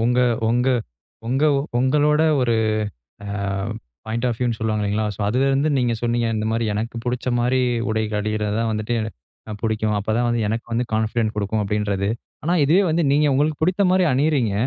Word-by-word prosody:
உங்க 125 +1 +2 0.3
உங்க 125 +3 +2 0.6
உங்க 135 +5 +1 0.3
உங்களோட 150 +4 +3 0.2
ஒரு 120 -2 +2 0.7
அ - - -6 0.8
பாயிண்ட் 115 +3 -1
ஆஃப் 115 - -2
வியூ 125 - 0
னு 115 - -4
சொல்லுவாங்க 110 -1 -1
இல்லைங்களா? 105 +1 0
ஸோ - - -10
அதிலிருந்து 135 +5 +2
நீங்க 120 -2 +1
சொன்னீங்க 120 0 +1
இந்த 110 0 -1
மாதிரி 115 0 0
"எனக்கு 115 +3 -3
பிடிச்ச 125 0 -3
மாரி 125 +2 +2 0.3
உடைகள் 110 -1 -1
அணியறது 105 0 -1
தான் 115 -1 0
வந்துட்டு 110 +2 -2 0.6
எ - - -3
பிடிக்கும். 110 -1 0
அப்போ 105 +2 -3
தான் 120 - +1
வந்து 120 -1 0
எனக்கு 115 +2 -3
வந்து 120 +2 +1
கான்ஃபிடன்ட் 110 0 0
கொடுக்கும்." 105 +1 -1
அப்படின்றது. 100 -1 -1 0.4
ஆனா 175 +2 +2
இதுவே 175 +8 +4
வந்து 165 +1 +1
நீங்க 150 +1 +3
உங்களுக்கு 150 +2 +1
பிடித்த 185 +4 +2
மாரி 185 -1 +4
அணியிறீங்க, 135 -6 +1
115 Hz, 175 wpm, -22 LUFS, 110-130 Hz, 0.8 s, இதுவே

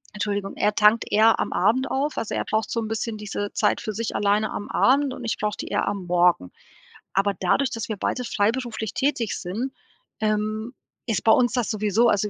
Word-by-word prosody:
Entschuldigung 205 -1 -2
er 210 0 +2
tankt 215 +2 +4
eher 220 +2 +5
am - - -1
Abend 240 +9 +2
auf. 285 +3 -1
Also 220 - -3
er - - -1
braucht 220 0 -1
so 230 - -1
'n 220 - -3
bisschen 225 0 -3
diese 205 -1 -4
Zeit - - +1
für 220 -3 -4
sich 225 +2 -3
alleine 205 +1 +1
am 205 - -5
Abend 275 +1 +3
und 255 - -8
ich 225 - -2
brauche 210 -1 -2
die - - -5
eher - - -1
am 195 -3 -3
Morgen. 175 - +2 0.6
Aber 195 +1 +2
dadurch, 260 +9 +2
dass 230 -1 -4
wir 215 - -3
beide 250 +5 -2
freiberuflich 225 0 -1
tätig 260 -5 -1
sind, 230 +9 -4 0.5
ähm, 215 +2 -1 0.3
ist 220 -5 -1
bei 220 - +5
uns 245 +1 +4
das 245 -4 0
sowieso 215 +2 +2
also 205 +1 +1
215 Hz, 205 wpm, -24 LUFS, 205-235 Hz, 0.6 s, eher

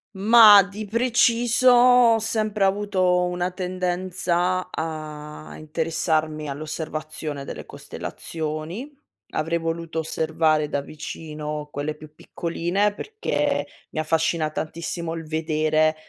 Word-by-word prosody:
Mah, 210 0 +8
di 200 +3 -7
preciso 240 +2 +3
ho 245 -1 +6
sempre 215 -2 -1
avuto 190 -2 +2
una 180 0 -2
tendenza 180 0 -1
a 155 -1 -6
interessarmi 155 -1 -1
all'osservazione 155 0 -5
delle - - -8
costellazioni. 160 - -6 0.4
Avrei 165 +2 0
voluto 165 0 -3
osservare 160 -1 +1
da 145 -1 -2
vicino 150 0 -6
quelle 145 +2 -3
più 150 0 -14
piccoline, 175 +6 -1
perché 435 - -2 0.2
mi - - -4
affascina 160 0 +1
tantissimo 165 +2 -4
il 165 -1 -6
vedere 155 0 +1
165 Hz, 100 wpm, -24 LUFS, 155-195 Hz, 0.4 s, Mah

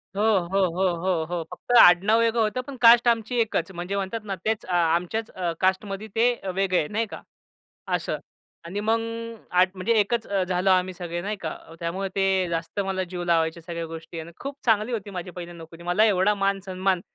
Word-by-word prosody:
हो, 205 - -1 0.3
हो. 195 +1 +2
हो, 190 0 +3
हो. 170 -1 0
हो. 175 -1 -2
फक्त 180 +7 -8
आडनाव 200 +4 +7
वेगळं 230 0 +2
होतं 220 +4 0
पण 280 - -7
कास्ट 235 0 +7
आमची 235 +1 +1
एकच 195 -5 0
म्हणजे 180 +2 -4
म्हणतात 200 +3 -2
ना, 200 -2 -4
तेच 220 0 0
अ, 185 - -7
आमच्याच 175 +6 +1
अ, 180 -2 -2
कास्टमध्ये 195 +2 0
ते 235 +2 +4 0.2
वेगळं 190 -1 +1
आहे 150 - -1
नाही 220 +2 -1
का - - -7 0.7
असं. - - -2 0.5
आणि 185 +5 -4
मग 225 +2 +1 0.7
म्हणजे 190 +5 0
एकच 230 +3 0 0.2
झालो 185 +1 +1
आम्ही 185 0 +2
सगळे 175 -1 -5
नाही 210 +3 -3
का. 165 -5 -5 0.2
त्यामुळे 185 +4 -2
ते 190 -2 +2
जास्त 165 +4 -3
मला 190 -1 -1
जीव 175 0 -6
लावायच्या 165 -1 +1
सगळ्या 170 0 -5
गोष्टी 165 0 -8
आणि 165 +2 -10
खूप 275 0 -5
चांगली 225 +1 +2
होती 205 -3 -4
माझी 180 -1 -6
पहिली 175 -1 -8
नोकरी. 165 0 -12
मला 175 +5 +3
एवढा 205 -1 +3
मान-सन्मान 195 -2 0
190 Hz, 190 wpm, -25 LUFS, 175-215 Hz, 0.7 s, आडनाव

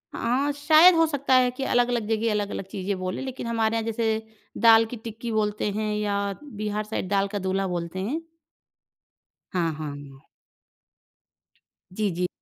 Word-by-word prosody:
हाँ, 265 +5 0
शायद 310 +5 +6
हो 325 - +5
सकता 285 -3 0
है 250 -1 +5
कि 260 +2 -5
अलग-अलग 240 -3 +1
जगह 225 0 +1
अलग-अलग 205 -2 -2
चीज़ें 195 0 -3
बोलें। 185 +4 -3
लेकिन 260 -2 -5
हमारे 225 -1 +1
यहाँ 225 - 0
जैसे, 220 -1 -1 0.3
दाल 225 -1 +6
की 245 - -4
टिक्की 230 +1 -6
बोलते 210 -1 0
हैं 215 +1 -2
या 210 -1 -1 0.3
बिहार 215 -6 -4
साइड 210 -3 -4
दाल 200 0 +2
का - - 0
दूल्हा 190 0 -1
बोलते 175 +1 -4
हैं। 260 +12 -2 1.3
हाँ, 170 -3 +1
हाँ। 145 -3 -8 1.7
जी, 210 0 0
जी। 180 +1 -1
215 Hz, 155 wpm, -25 LUFS, 195-245 Hz, 1.7 s, शायद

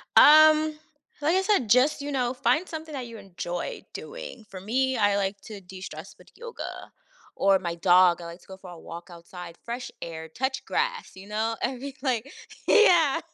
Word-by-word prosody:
Um, 310 0 +7 0.5
like 310 +4 +2
I 380 - +3
said, 385 - +1
just, 255 +6 +4
you 285 +1 -4
know, 250 -2 0
find 260 +7 +1
something 320 -1 -7
that 260 -3 -5
you 230 -1 -10
enjoy 190 - -5
doing. - - -9
For 190 -1 -9
me, 260 +5 0
I 205 -2 +3
like 200 0 -2
to 215 -2 -9
destress 185 -2 -10
with - - -19
yoga, 475 0 -8 0.4
or 195 -1 +3
my 170 -2 -4
dog, 175 0 +4
I - - -8
like 170 +1 -9
to - - -22
go 190 - -10
for 190 -1 -12
a 170 - -11
walk 170 +3 -10
outside, 170 0 -11
fresh 240 +2 -6
air, 160 -1 -6
touch 265 - -3
grass, - - -2
you 190 +1 -12
know? 220 +2 -1
I'd 255 -2 -2
be 275 +1 -7
like 260 -1 -1 0.4
Yeah! 340 - +5
230 Hz, 190 wpm, -26 LUFS, 185-290 Hz, 0.5 s, Um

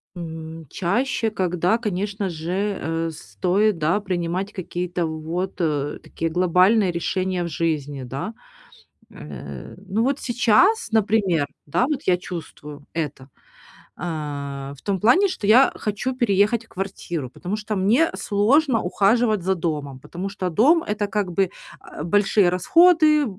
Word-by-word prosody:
М, 160 -1 -7
чаще, 225 +4 0
когда, 180 +1 +1
конечно 205 -2 -2
же, 165 0 -5 0.3
э, 165 +1 -2
стоит, 185 +5 0
да, 165 +6 +2
принимать 185 0 -3
какие-то 175 -2 -3
вот, 160 +4 -3
э, 145 -3 -1
такие 165 - -3
глобальные 185 +4 +3
решения 185 +1 -1
в - - -3
жизни, 150 -4 -2
да. 135 - -5 0.8
Э, - - -9
ну, 220 +4 0
вот 275 +1 0
сейчас, 250 - +3
например, 200 -8 +2 0.2
да, 150 - +1
вот 295 -3 -2
я 180 -1 +3
чувствую 150 -5 -9
это, 145 -4 -4 0.7
а, 140 -4 -5
в - - -17
том 195 -2 -1
плане, 295 - +5
что 360 - -4
я 250 +5 +6
хочу 230 +5 -3
переехать 225 -1 +2
в - - -28
квартиру, 175 -7 -5
потому 185 +3 -4
что 215 0 -4
мне 225 +12 +3
сложно 230 +5 +2
ухаживать 215 +3 +2
за 190 - +2
домом, 150 -6 -3
потому 180 +8 -6
что 190 -2 -3
дом- 285 - +4
это, 210 0 -1
как 200 -2 -2
бы, 190 +1 +1 0.5
э, - - -3
большие 200 +2 +3
расходы, 305 - +5
185 Hz, 140 wpm, -23 LUFS, 165-215 Hz, 0.8 s, я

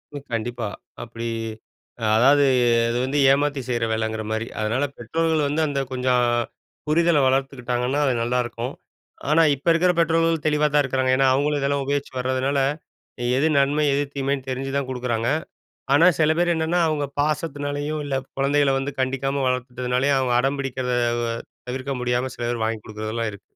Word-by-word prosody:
ஓ! - - -3 0.2
கண்டிப்பா. 120 0 -2 0.4
அப்டி 115 0 -6 0.9
அதாவது 140 +5 +5 0.4
அது 120 - -1
வந்து 135 +3 -1
ஏமாத்தி 145 0 +1
செய்யற 120 -2 0
வேலைங்கற 110 0 -2
மாரி. 110 +1 -2
அதனால 115 +6 0
பெற்றோர்கள் 160 +5 0
வந்து 150 +3 0
அந்த 140 -1 -2
கொஞ்சம் 125 -1 +1 0.6
புரிதல 165 0 +3
வளர்த்துக்கிட்டாங்கன்னா 130 0 0
அது 130 - +2
நல்லாருக்கும். 120 +1 -2 0.6
ஆனா 165 +2 +5
இப்ப 140 +5 -14
இருக்குற 180 +2 +3
பெற்றோர்கள் 165 -1 +2
தெளிவா 150 0 +3
தான் 145 - +5
இருக்கிறாங்க. 130 0 0
ஏன்னா 135 -1 +4
அவங்களும் 145 +2 +1
இதெல்லாம் 140 0 0
உபயோகிச்சு 140 -1 -2
வரதுனால 130 +2 0 0.8
எது 155 +4 +3
நன்மை? 145 +2 +2
எது 145 +1 +1
தீமைன்னு? 135 -1 -2
தெரிஞ்சு 135 +1 -3
தான் 140 -2 -2
குடுக்குறாங்க. 120 -2 -1 0.6
ஆனா 165 +5 +6
சில 155 0 +4
பேர் 175 0 +2
என்னன்னா, 160 +2 0
அவங்க 150 -2 -1
பாசத்துனாலயும் 145 0 -2
இல்ல 135 -1 -2 0.2
கொழந்தைகள 140 0 +2
வந்து 140 +2 -3
கண்டிக்காம 135 +1 -1
வளர்த்துட்டதுனாலயே 125 +2 0
அவங்க 130 -2 +1
அடம் 135 +2 0
பிடிக்கிறத 130 -2 -2 0.4
அ - - -3 0.3
தவிர்க்க 130 +2 -3
முடியாம 125 +1 -1
சில 120 - -6
பேர் 115 -2 -2
வாங்கிக் 110 -1 -3
குடுக்குறதுலாம் 110 +1 -3
இருக்கு. 100 - -12
135 Hz, 155 wpm, -23 LUFS, 125-145 Hz, 0.9 s, ஆனா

